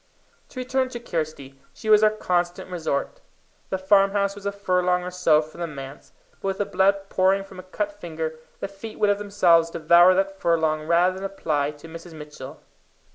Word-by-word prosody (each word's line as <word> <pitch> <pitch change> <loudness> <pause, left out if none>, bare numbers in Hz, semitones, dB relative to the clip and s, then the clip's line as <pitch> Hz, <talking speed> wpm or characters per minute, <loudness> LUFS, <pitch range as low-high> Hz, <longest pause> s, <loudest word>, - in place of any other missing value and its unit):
To 255 - -8
return 260 +1 0
to 245 -2 -6
Kirsty: 155 - -5 0.2
she - - -9
was 215 -1 +6
our 215 - +6
constant 180 -4 -2
resort. 160 -5 -3 0.5
The 190 - -1
farmhouse 195 +1 +3
was 200 0 -7
a - - 0
furlong 180 -2 0
or 180 - -5
so 180 -4 +3
from 155 +3 -12
the 170 - -1
manse, 140 -2 -10 0.3
but - - -3
with 190 0 -1
the 205 - 0
blood 195 +1 +1
pouring 190 +1 +2
from 195 -1 -13
a 185 0 -12
cut 205 +1 -2
finger, 160 -5 -6 0.2
the - - -2
feet 200 +3 -10
would 210 -1 +3
of 205 - -1
themselves 175 -5 +3
devour 170 +3 +5
that 195 0 -1
furlong 160 -2 +1
rather 175 +2 +3
than 190 +1 -8
apply 155 -7 -1
to 155 - -12
Mrs. 165 0 -10
Mitchell. 150 -2 -10
180 Hz, 190 wpm, -24 LUFS, 160-200 Hz, 0.5 s, was